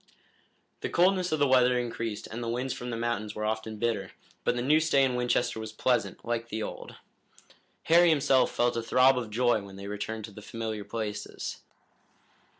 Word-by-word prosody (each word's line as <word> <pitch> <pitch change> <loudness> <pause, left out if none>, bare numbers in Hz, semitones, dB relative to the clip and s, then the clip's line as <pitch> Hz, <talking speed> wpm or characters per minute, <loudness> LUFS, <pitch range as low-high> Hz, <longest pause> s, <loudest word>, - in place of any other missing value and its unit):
The - - -3
coldness 185 +1 +3
of 155 - +2
the 145 -1 +3
weather 125 -1 +4
increased 115 -3 -3
and 115 +2 -6
the 115 - -3
winds 125 +2 -2
from 125 - -6
the 115 - -3
mountains 115 -3 -2
were 105 - -3
often 110 0 -3
bitter, 110 -4 -2 0.3
but - - +1
the 120 - -2
new 150 +4 +4
stay 150 -4 +3
in 130 -1 +2
Winchester 125 -1 0
was 110 - -6
pleasant, 125 -1 0
like 120 0 -2
the 110 -1 -3
old. - - -7 0.9
Harry 170 +1 +6
himself 135 -4 +3
felt 120 0 +1
a 115 - 0
throb 130 +3 +4
of 120 -3 -3
joy 120 0 +2
when 100 -1 -11
they 100 0 -8
returned 105 +2 -4
to 110 - -12
the 105 - -11
familiar 110 0 -5
places. 105 -1 -5
120 Hz, 190 wpm, -28 LUFS, 110-130 Hz, 0.9 s, Harry